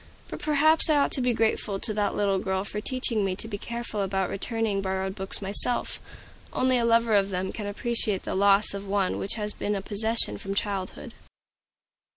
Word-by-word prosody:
But - - -7
perhaps 310 +2 +5
I 305 - +4
ought 280 - +2
to 265 - -1
be 250 0 +2
grateful 220 -3 0
to 215 - -3
that 205 -1 -1
little 200 -2 +1
girl 190 0 -2
for 210 +1 -5
teaching 240 -3 0
me 190 -1 -1
to 220 - -5
be 205 -2 -6
careful 235 -2 -4
about 190 -1 -1
returning 215 0 -2
borrowed 190 0 -3
books 190 0 -3
myself. 205 +5 +2 0.5
Only 255 -1 +2
a 235 - +1
lover 230 -1 +3
of 200 -1 +3
them 190 0 -3
can 210 -2 -6
appreciate 215 -1 -1
the - - -4
loss 200 +2 +3
of 200 0 -7
one 195 -1 0
which 195 - -3
has 210 -2 0
been 205 - -3
a 195 - -3
possession 210 - +2
from 195 - -5
childhood. 200 -2 -3
205 Hz, 195 wpm, -26 LUFS, 195-230 Hz, 0.5 s, perhaps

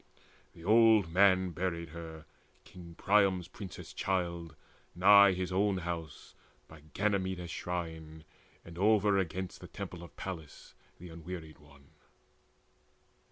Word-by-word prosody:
The 85 - -14
old 110 -2 +5
man 95 0 +4
buried 85 -1 -3
her, 80 -1 -9 0.4
King 85 -2 -13
Priam's 95 -3 +2
princess 95 -4 -10
child, 85 -4 -2 0.4
nigh 100 +2 +7
his 90 0 -3
own 100 +1 +1
house, 85 -3 -6 0.3
By 80 -1 -14
Ganymedes' 95 -4 -1
shrine, 80 -3 -6 0.4
and 85 0 -11
overagainst 95 -3 +1
The - - -10
temple 85 - -8
of 85 - -12
Pallas 80 -6 -8 0.2
the 90 - -11
Unwearied 80 -1 -9
One. 70 -2 -20
90 Hz, 115 wpm, -31 LUFS, 85-95 Hz, 0.4 s, nigh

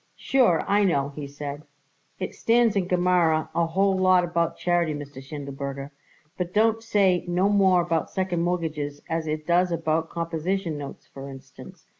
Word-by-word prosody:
"Sure, 240 - +2
I 205 +1 +3
know," 140 -7 +1
he 145 0 -7
said, 145 +1 -6 0.6
"it 185 - -4
stands 230 -2 +2
in 190 -3 0
Gemara 175 -3 +2
a 170 -1 +1
whole 195 +3 +2
lot 185 -1 +4
about 170 -1 -1
charity, 175 -3 +1
Mr. 145 -2 -8
Schindelberger, 140 0 -6 0.5
but 180 - 0
it 180 - -23
don't 225 +1 +3
say 195 -5 +2
no 180 +3 +2
more 190 -3 +4
about 165 -2 -1
second 185 -3 -1
mortgages 155 -5 -2
as 165 -1 -2
it 155 0 -3
does 175 +2 +2
about 160 -1 0
composition 170 +1 -2
notes, 145 -1 -8
for 135 0 -10
instance. 135 0 -13
170 Hz, 165 wpm, -25 LUFS, 150-185 Hz, 0.6 s, lot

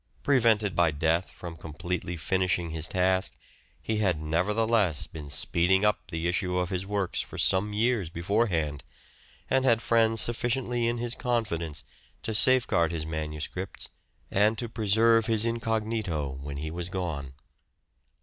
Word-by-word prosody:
Prevented 110 -7 +3
by 85 -1 +4
death 80 +4 0
from 85 -2 -9
completely 85 +2 -5
finishing 90 0 0
his 80 0 -2
task, 95 0 +1 0.4
he 110 - -2
had 95 -7 +1
nevertheless 100 +3 +1
been 75 -2 -9
speeding 90 +7 +2
up 105 - 0
the 80 -2 -3
issue 90 +1 0
of 90 +1 -1
his 95 +1 -3
works 100 -3 -1
for - - -9
some 95 +3 +3
years 110 -4 +1
beforehand, 85 -5 -1 0.6
and 130 0 +2
had 120 -4 +4
friends 115 -1 +2
sufficiently 120 +1 +1
in 120 +1 0
his 120 0 -2
confidence 105 - -2 0.4
to 110 0 -2
safeguard 115 -8 +4
his 80 -2 -3
manuscripts 80 +4 -5 0.4
and 105 +3 +3
to 120 - -2
preserve 115 +1 +3
his 110 -1 +3
incognito 110 -9 -1
when 70 0 -6
he 80 +2 -4
was 85 +1 -4
gone. 80 -8 -4
95 Hz, 140 wpm, -27 LUFS, 85-115 Hz, 0.6 s, by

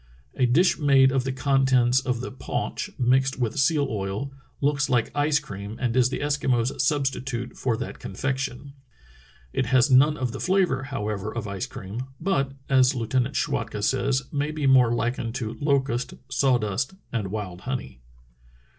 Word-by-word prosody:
A 125 - +2
dish 170 +10 +3
made 135 -3 +5
of 130 -1 0
the 135 - -1
contents 130 -2 +3
of 125 -3 -2
the 130 - -5
paunch, 130 - -4
mixed 130 +2 +2
with 125 +3 -1
seal 145 +1 +3
oil, 105 +3 -3 0.3
looks 145 0 +1
like 120 -3 +1
ice 145 +1 +3
cream 105 -8 -7
and 125 -2 -1
is 125 -1 +4
the - - -4
Eskimos' 130 -5 0
substitute 135 -3 -1
for 120 -4 -1
that - - -6
con 95 - -8
fection." 135 +2 -3 0.8
It 130 - 0
has 130 +2 +3
none 145 +4 +5
of 125 -3 -2
the - - -6
flavor, 185 -9 +1
however, 105 -6 -3
of 115 -2 -4
ice 100 -2 -4
cream, 105 +7 -6
but, 140 -7 0
as 130 0 +4
Lieutenant 125 +3 -1
Schwatka 115 -7 -2
says, 135 +3 +1
may 145 0 -1
be 155 -2 -3
more 130 -3 +5
likened 120 0 -1
to 115 -4 -3
locust, 135 -4 0
sawdust 125 - +1 0.2
and 110 -5 -1
zvild 95 -3 -5
honey. 130 - -5
130 Hz, 165 wpm, -25 LUFS, 120-140 Hz, 0.8 s, made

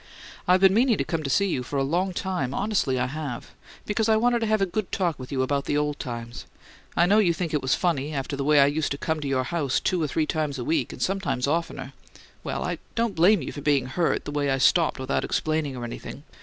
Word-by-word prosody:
"I've 185 +1 +4
been 190 -1 +6
meaning 235 0 +3
to - - 0
come 165 -3 -2
to 140 - -4
see 200 +9 +3
you 150 -9 -1
for 135 +3 -4
a 135 - +2
long 175 +7 0
time 175 -8 -2
honestly 195 -11 0
I 125 - +1
have 135 -2 -5 0.3
because 215 +1 0
I 220 - +5
wanted 240 +1 +2
to 225 - -1
have 215 0 +2
a 195 - +3
good 195 +2 -3
talk 175 -6 -1
with 130 - -8
you 130 -2 +1
about 140 +1 -1
old 150 0 0
times. 120 -2 -6 0.5
I 170 - +5
know 205 +4 +4
you 175 -6 +3
think 165 -1 -3
it 150 - +1
was 130 - +2
funny, 155 -5 0
after 140 -1 -3
the 140 - -3
way 150 +1 +4
I 140 - +7
used 145 +2 0
to - - -5
come 160 +2 -2
to 145 - -4
your 130 -1 +1
house 140 -1 0
two 180 -2 0
or 155 - +1
three 155 +3 0
times 150 -3 -2
a 125 - -4
week, 165 - 0
and - - -9
sometimes 145 -10 -1
oftener 165 +4 -2 0.5
well, - - -3
I - - -3 0.2
don't 230 -2 0
blame 180 +1 +4
you - - -5
for 145 - -7
being 140 -3 +2
hurt, 165 +7 0
the - - -4
way 145 -1 0
I 135 - +2
stopped 165 +5 +3
without 130 0 -1
explaining 155 -3 -1
or 120 - -5
anything. 120 +3 -7
150 Hz, 255 wpm, -25 LUFS, 135-185 Hz, 0.5 s, I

